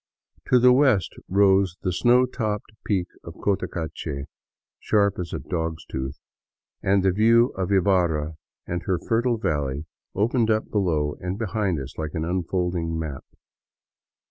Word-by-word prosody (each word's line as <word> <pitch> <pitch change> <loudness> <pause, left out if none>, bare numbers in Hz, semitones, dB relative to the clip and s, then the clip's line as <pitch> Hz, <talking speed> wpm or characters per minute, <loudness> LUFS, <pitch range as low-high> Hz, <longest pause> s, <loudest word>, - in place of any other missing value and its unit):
To 125 - +5
the 125 +1 +6
west 130 - +3 0.2
rose 95 -1 +3
the 90 - 0
snow 125 +6 +4
topped 110 -5 -3
peak 95 -4 +1 0.2
of - - -9
Cotacache, 80 -7 -3 0.5
sharp 100 -3 +2
as 85 -2 -4
a - - -2
dog's 80 +1 -4
tooth, 65 +1 -5 0.6
and 95 0 +2
the 95 - +4
view 115 +5 +4
of 95 0 -3
Ibarra 85 -5 +2 0.3
and 90 0 -3
her 95 -2 +2
fertile 115 +5 0
valley 75 - -2 0.3
opened 115 +3 +2
up 110 0 0
below 80 -8 0
and 90 +2 -3
behind 105 -6 -1
us 70 +3 -8
like 80 -1 -4
an 80 0 -1
unfolding 90 -1 -1
map. 75 -5 -5
95 Hz, 145 wpm, -24 LUFS, 80-105 Hz, 0.6 s, the